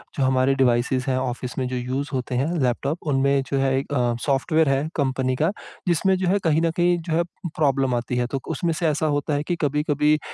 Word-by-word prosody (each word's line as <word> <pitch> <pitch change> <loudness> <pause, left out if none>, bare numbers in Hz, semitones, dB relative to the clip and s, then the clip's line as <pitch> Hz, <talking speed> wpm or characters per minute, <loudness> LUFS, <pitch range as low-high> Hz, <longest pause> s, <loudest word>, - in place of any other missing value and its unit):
जो 140 - 0
हमारे 130 +1 +3
डिवाइसेस 130 0 +1
हैं 130 -1 +1
ऑफ़िस 125 -1 -4
में 130 -2 -1
जो 125 - -4
यूज़ 130 +3 -3
होते 130 -1 -2
हैं 135 +4 +1
लैपटॉप, 135 +5 0
उनमें 140 0 +2
जो 140 - +1
है 135 0 +2
एक 140 +1 -6
अ, 120 -3 +1
सॉफ्टवेयर 155 +2 +2
है 135 +2 +1
कंपनी 130 -2 0
का, 160 +4 +3 0.4
जिसमें 185 +3 +3
जो 185 0 -1
है 195 +3 +3
कहीं 160 -1 +2
न 165 0 +2
कहीं 175 0 +3
जो - - 0
है 170 - +3 0.3
प्रॉब्लम 135 -4 +2
आती 120 +1 -2
है। 120 0 0
तो 135 +2 -3
क - - -19
उसमें 170 - +1
से 165 +1 -1
ऐसा 155 0 0
होता 145 0 0
है 145 0 0
कि 175 - 0
कभी-कभी 150 0 +2
अ, - - -3
140 Hz, 240 wpm, -23 LUFS, 130-155 Hz, 0.4 s, हमारे